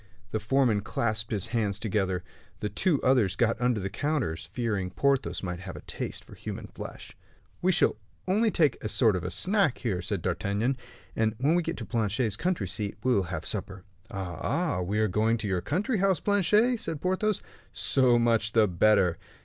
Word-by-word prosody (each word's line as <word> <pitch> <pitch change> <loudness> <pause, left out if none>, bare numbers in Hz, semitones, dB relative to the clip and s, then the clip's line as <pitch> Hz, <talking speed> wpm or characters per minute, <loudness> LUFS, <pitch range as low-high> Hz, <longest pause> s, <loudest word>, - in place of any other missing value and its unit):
The 110 - 0
foreman 110 -1 +2
clasped 110 0 -1
his 100 -4 -1
hands 105 -4 0
together. 95 -4 -1 0.4
The 105 - -2
two 165 - +1
others 120 -7 +3
got 120 +1 +1
under 125 -3 +2
the 95 0 -4
counters, 125 - -2
fearing 105 -5 -1
Porthos 135 +6 0
might 90 -2 -3
have 95 -2 -7
a 75 - -8
taste - - -5
for - - -14
human - - -6
flesh. - - -9 0.5
"We 185 - +3
shall 175 - +2 0.3
only 215 +5 +3
take 155 -7 +1
a 105 - -2
sort 110 -2 +3
of 90 0 -3
snack 185 - +2
here," 100 -8 -2
said 95 -2 -3
D'Artagnan; 100 +8 0 0.4
"and 110 0 +1
when 140 +7 +2
we 175 - +3
get 165 0 -4
to - - -5
Planchet's 110 -1 0
country 170 - -1
seat, 105 +2 -2
we 130 - +3
will 100 - +3
have 80 -4 -4
supper." 95 0 -3 0.3
"Ah, 95 -6 -5
ah! 170 - 0
so - - -1
we 100 +4 -1
are 110 0 +3
going 110 +4 +2
to 110 -2 -4
your 95 -3 0
country 205 - 0
house, 190 -4 +2
Planchet," 210 +4 +3
said 165 -8 -3
Porthos; 185 +4 0 0.3
"so 130 -3 +4
much 115 -1 +2
the 110 -2 +5
better." 95 -1 +3
110 Hz, 190 wpm, -28 LUFS, 100-145 Hz, 0.5 s, the